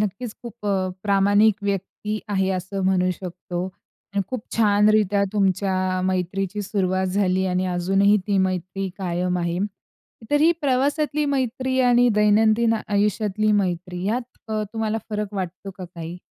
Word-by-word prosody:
नक्कीच 215 +3 -3
खूप 235 -3 -8
अ, 200 - +2 0.3
प्रामाणिक 205 +1 +4
व्यक्ती 200 +2 -3
आहे 190 -2 +1
असं 190 +1 -3
म्हणू 185 -1 +2
शकतो 180 -1 -5 0.5
अन् 200 - +2
खूप 255 -4 -4
छान 210 -2 +4
रित्या 205 -2 +3
तुमच्या 190 -2 +1
मैत्रीची 190 +2 -1
सुरुवात 190 -2 0
झाली 190 0 +1
आणि 185 0 0
अजूनही 195 +3 +3
ती 200 -2 +2
मैत्री 185 +1 -1
कायम 180 0 -1
आहे. 170 0 -1 0.7
तर 290 0 +3
ही 320 +2 +6
प्रवासातली 290 +2 +1
मैत्री 260 -1 -1
आणि 245 0 +5
दैनंदिन 215 +2 +4 0.2
आयुष्यातली 210 +1 +1
मैत्री 180 -2 -1
यात 235 +5 0 0.3
अ, 215 -1 -1
तुम्हाला 220 -1 -1
फरक 210 -1 -3
वाटतो 190 0 -5
का 185 - -5
काही? 170 -1 -8
200 Hz, 140 wpm, -23 LUFS, 185-215 Hz, 0.7 s, ही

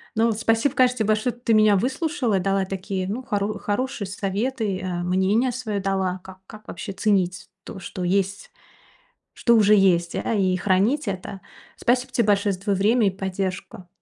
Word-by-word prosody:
Ну, 225 +1 +3
вот 220 -2 -1
спасибо, 230 +4 +1
конечно, 255 -1 +3
те - - +2
большое, 215 +3 0
ты 240 -1 0
меня 215 -1 +5
выслушала, 255 - 0
дала 195 +1 0
такие, 190 0 -4
ну, 225 +7 -4
хоро 205 -3 -2
хорошие 210 -1 -2
советы, 205 +1 -2
э, 180 -2 -3
мнение 190 +8 +1
своё 220 -5 -3
дала, 190 -1 -1
как 190 0 -12
как 215 -1 -13
вообще 205 - -6
ценить 190 -2 0
то, 195 - -9
что 185 0 -6
есть 195 +2 -1 0.8
что 235 - +3
уже 210 -2 +5
есть, 175 -3 +2
а, 195 - -1
и 190 -3 +2
хранить 200 - +1
это. 195 0 -5 0.4
Спасибо 250 +2 0
те 235 -3 +1
большое 205 0 +2
за - - -9
твоё 200 0 0
время 215 +4 +3
и - - +3
поддержку. 190 +1 -5
200 Hz, 175 wpm, -23 LUFS, 190-230 Hz, 0.8 s, меня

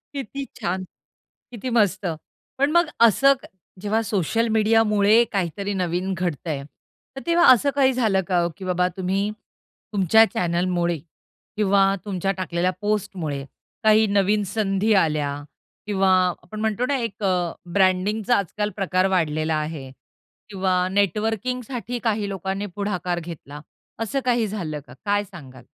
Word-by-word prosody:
किती 275 +1 -5
छान! 185 +2 -2 0.7
किती 245 +2 -5
मस्त! 205 -2 +2 0.5
पण 280 +2 +2
मग 345 +1 +4 0.2
असं 275 +6 +5 0.5
जेव्हा 210 +2 0
सोशल 225 +4 +1
मीडियामुळे, 215 0 +4
काहीतरी 200 +1 -2
नवीन 180 0 -1
घडतं 175 -3 -3
आहे, 140 -3 -3
तर 265 - -15
तेव्हा 340 0 +4
असं 255 +4 +1
काही 265 -2 +4
झालं 220 -6 +2
का, 175 -2 +2
की 190 - -8
बाबा 180 0 +1
तुम्ही 195 +2 0 0.6
तुमच्या 205 +2 +5
चॅनेलमुळे, 175 0 0 0.6
किंवा 200 -2 +3 0.2
तुमच्या 195 -1 -1
टाकलेल्या 180 0 0
पोस्टमुळे 190 -9 -2 0.4
काही 220 0 +5
नवीन 205 +1 +2
संधी 210 0 +1
आल्या 150 -3 -1 0.5
किंवा 195 -2 +2 0.3
आपण 195 +5 -9
म्हणतो 220 +2 0
ना 275 +2 0
एक 225 -4 -5
अ 190 -2 +3 0.4
ब्रँडिंगचा 200 +4 +2
आजकाल 205 +2 -2
प्रकार 185 -2 +1
वाढलेला 160 -4 0
आहे 150 -3 -4 0.6
किंवा 185 -2 0
नेटवर्किंगसाठी 225 +5 -1
काही 215 -3 0
लोकांनी 195 +1 -3
पुढाकार 180 -4 -2
घेतला, 155 -3 -9 0.4
असं 225 +5 -1
काही 240 -3 +2
झालं 170 -8 -4
का? 125 - -12
काय 205 0 +1
सांगाल? 135 - -13
195 Hz, 130 wpm, -23 LUFS, 180-220 Hz, 0.7 s, असं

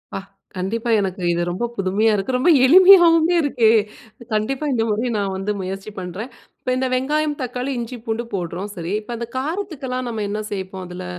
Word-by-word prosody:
அப்பா, - - -2 0.4
கண்டிப்பா 220 +6 -3
எனக்கு 190 -2 -3
இது 170 - -1
ரொம்ப 180 +7 -2
புதுமையா 200 +3 +1
இருக்கு. 205 +6 -1
ரொம்ப 260 +8 +2 0.2
எளிமையாவுமே 350 0 +7
இருக்கு. 255 -7 +2 0.6
கண்டிப்பா 255 +7 -1
இந்த 225 -2 +1
முறை 220 +4 0
நான் 200 -2 -1
வந்து 195 +2 -2
முயற்சி 195 +3 -6
பண்றேன். 190 +7 -6 0.3
இப்ப - - -4
இந்த 260 0 0
வெங்காயம், 295 +3 0
தக்காளி, 250 +2 -3
இஞ்சி, 240 +1 -5
பூண்டு 225 +2 -2
போடுறோம் 180 +2 -4
சரி. 170 +2 -4
இப்ப 220 +3 -7
அந்த 235 0 -5
காரத்துக்கெல்லாம் 275 -5 -3
நம்ம 220 -2 -3
என்ன 210 +1 -2
சேர்ப்போம்? 190 -1 -6
அதுல. 180 - -7
225 Hz, 170 wpm, -21 LUFS, 195-265 Hz, 0.6 s, எளிமையாவுமே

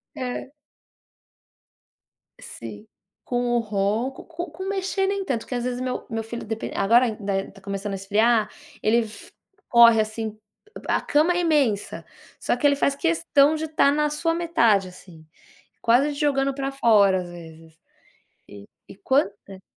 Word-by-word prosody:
É. 255 +1 -5 1.9
Sim, 110 -2 -10 0.4
com 245 -1 -1
o - - +3
ronco, 215 +4 -2
com 345 +1 -6
com 375 +5 -7
mexer 385 0 -1
nem 395 0 -2
tanto, 240 -7 -3
que 250 - -5
às 240 0 -2
vezes 250 0 -3
meu 255 0 -4
meu 225 0 -3
filho 230 +1 -7
depen 225 0 -5
agora 235 +5 +4
ainda 200 -3 -2
está 195 0 -14
começando 200 +1 -5
a - - -2
esfriar, 215 +3 +2 0.3
ele 230 +2 +3
f 215 - -12 0.4
corre 235 -2 +7
assim, 215 0 -3 0.5
a - - +3
a - - -1
cama 310 +4 +2
é 355 - 0
imensa, 280 - 0 0.3
só - - 0
que 290 - +1
ele 280 -1 +4
faz 280 0 +1
questão 315 -2 +2
de 315 0 -3
estar 305 -2 +3
na 300 0 +1
sua 330 +2 0
metade, 235 - +2
assim, 170 -3 -15 0.6
quase 255 +6 +3
te 285 - -8
jogando 275 -2 +1
para 275 0 -3
fora, 205 -8 +4
às 175 - -10
vezes. 165 -2 -12 1.2
E - - -10
e - - -16
quanta 200 -7 -1
235 Hz, 160 wpm, -24 LUFS, 205-290 Hz, 1.9 s, corre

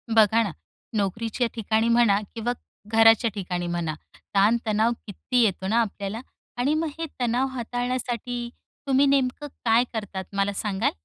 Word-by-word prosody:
बघा 220 +1 +5
ना, 200 - -3 0.5
नोकरीच्या 225 +4 -1
ठिकाणी 220 +1 +1
म्हणा 230 -4 +4 0.2
किंवा 235 +1 -1 0.4
घराच्या 225 +1 +6
ठिकाणी 180 -2 -3
म्हणा. 170 -2 -2 0.4
ताण-तणाव 220 +2 +3 0.2
किती 240 +5 0
येतो 190 -3 0
ना 225 +4 +3
,आपल्याला 205 0 -4 0.4
आणि 260 +5 +2
मग 315 +1 0
हे 330 - -1
तणाव 245 +2 +1
हाताळण्यासाठी 245 0 -3 0.4
तुम्ही 270 +1 +4
नेमकं 275 +1 +1 0.2
काय 230 +1 +5
करतात, 205 -4 -4
मला 200 0 +1
सांगाल? 200 0 0
225 Hz, 135 wpm, -25 LUFS, 200-245 Hz, 0.5 s, घराच्या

